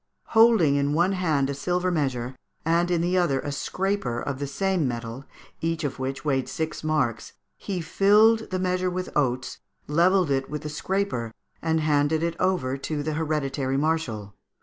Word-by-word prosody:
Holding 220 -11 +5
in 140 +1 +1
one 175 +4 +3
hand 160 -8 +1
a 140 - -2
silver 180 +5 -1
measure, 130 -6 -1 0.3
and 170 +2 +2
in 175 -2 +1
the 180 +2 +2
other 140 -7 +2
a 145 - -4
scraper 180 -4 -2
of 135 0 -4
the 140 - -2
same 190 -1 0
metal, 120 +2 -5 0.4
each 165 0 -1
of 140 -3 -3
which 135 +1 -4
weighed 135 -3 0
six 160 -1 -4
marks, 140 -8 -1 0.2
he 190 -3 -4
filled 215 +6 +4
the 185 - -1
measure 185 0 0
with 185 +1 -5
oats, 130 -3 0 0.3
levelled 175 +2 +3
it 135 0 0
with 150 +1 -5
the 150 - -4
scraper, 165 - -2 0.3
and 160 -1 +1
handed 150 +1 +2
it 170 0 -1
over 155 -9 0
to 145 +2 -3
the 155 +1 -2
hereditary 145 -4 -1
marshal. 135 -10 -1
155 Hz, 170 wpm, -25 LUFS, 135-180 Hz, 0.4 s, Holding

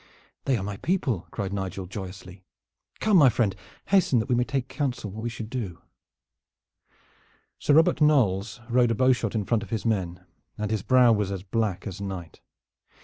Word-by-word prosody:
"They 130 -3 +2
are 95 - -4
my 100 0 -4
people," 135 - -1
cried 100 -2 -4
Nigel 95 -1 -4
joyously. 95 -1 -9 0.6
"Come, 215 -3 +4
my 145 -6 +7
friend, 105 -4 0 0.3
hasten, 190 -10 +4
that 110 - 0
we - - +3
may 120 0 +3
take 135 0 -2
counsel 130 -9 -3
what 110 +3 -7
we 120 - -2
shall 115 -1 -6
do." 110 -8 -5 1.8
Sir 145 - +3
Robert 160 0 +4
Knolles 115 -8 +2
rode 120 0 +3
a 115 - +1
bowshot 125 -3 +2
in 105 -3 -1
front 115 0 +1
of - - -9
his 110 -3 -3
men, 95 -6 -1 0.3
and 105 0 -3
his 110 -3 0
brow 125 +1 +5
was 105 -3 +1
as 95 -2 -4
black 100 -2 -2
as 100 -1 -6
night. 95 -5 -6
110 Hz, 180 wpm, -26 LUFS, 95-125 Hz, 1.8 s, my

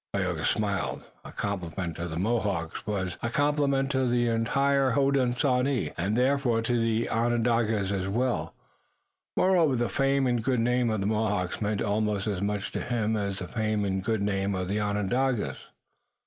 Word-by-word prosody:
Tayoga - - -1
smiled. 100 -3 -1 0.2
A - - -10
compliment 90 -3 -3
to 85 +1 -3
the 80 -1 -5
Mohawks 100 -3 -1
was 95 -4 -2
a 120 - -1
compliment 140 0 +1
to 130 -2 +1
the 120 0 +2
entire 135 +4 +2
Hodenosaunee, 130 -1 +1
and 100 +6 -1
therefore 125 -3 +2
to 120 0 +1
the 115 0 +1
Onondagas 115 -3 +1
as 95 -2 -1
well. 120 +5 -1 0.8
Moreover 175 -7 +4
the 120 -2 0
fame 135 +5 +2
and 120 -3 +1
good 130 -1 +1
name 125 +1 +2
of 110 -2 -1
the - - -1
Mohawks 105 -4 -1
meant 105 -1 0
almost 105 -1 0
as 100 -4 -2
much 100 0 -2
to - - -3
him 110 -2 -1
as 100 -2 -2
the 90 - -5
fame 110 -2 -1
and 95 -1 -1
good 110 -1 0
name 100 -1 0
of 90 0 -3
the 105 +2 0
Onondagas. 105 +4 -1
110 Hz, 165 wpm, -27 LUFS, 100-125 Hz, 0.8 s, Moreover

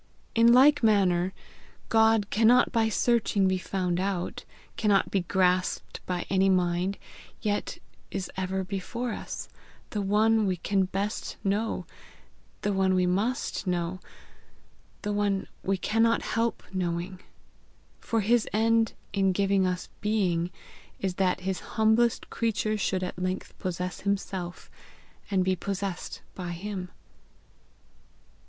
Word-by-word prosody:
In 230 +1 +6
like 280 +4 +6
manner 190 -5 +3 0.6
God 220 -2 +4
cannot 230 +3 +5
by 225 -1 +2
searching 220 -4 +2
be 185 0 +1
found 180 -2 -1
out, 190 -2 -2 0.3
cannot 205 -3 +2
be 195 - +2
grasped 180 0 0
by 180 -1 -2
any 195 0 +3
mind, 180 +1 +1 0.5
yet 205 -1 -1 0.3
is 190 -2 -3
ever 190 0 -2
before 205 +6 -4
us, - - -6 0.4
the 210 - -1
one 215 +2 +3
we 185 -1 0
can 195 +2 +1
best 200 +3 -3
know, 205 +3 -1 0.8
the 205 - +1
one 190 -1 +2
we 180 0 +3
must 210 +5 -1
know, 175 0 -1 1.0
the 210 -1 -1
one 205 -1 0 0.2
we 195 0 0
cannot 225 +4 +2
help 230 +1 -1
knowing; 180 0 -2 0.8
for 225 -1 0
his 230 +3 +2
end 225 +1 +3 0.2
in 195 -1 +3
giving 195 0 +2
us 180 0 -2
being 185 -5 +1 0.5
is 190 -2 -1
that 185 -1 +1
his 190 0 -2 0.2
humblest 220 +2 +3
creature 220 -1 0
should 190 -2 -1
at 180 - -4
length 185 +1 -3
possess 180 0 -3
himself, 190 -3 -3 0.6
and 190 -2 +2
be 185 0 +2
possessed 195 0 -4
by 175 -2 -5
him." 185 0 -5
195 Hz, 125 wpm, -28 LUFS, 185-215 Hz, 1.0 s, In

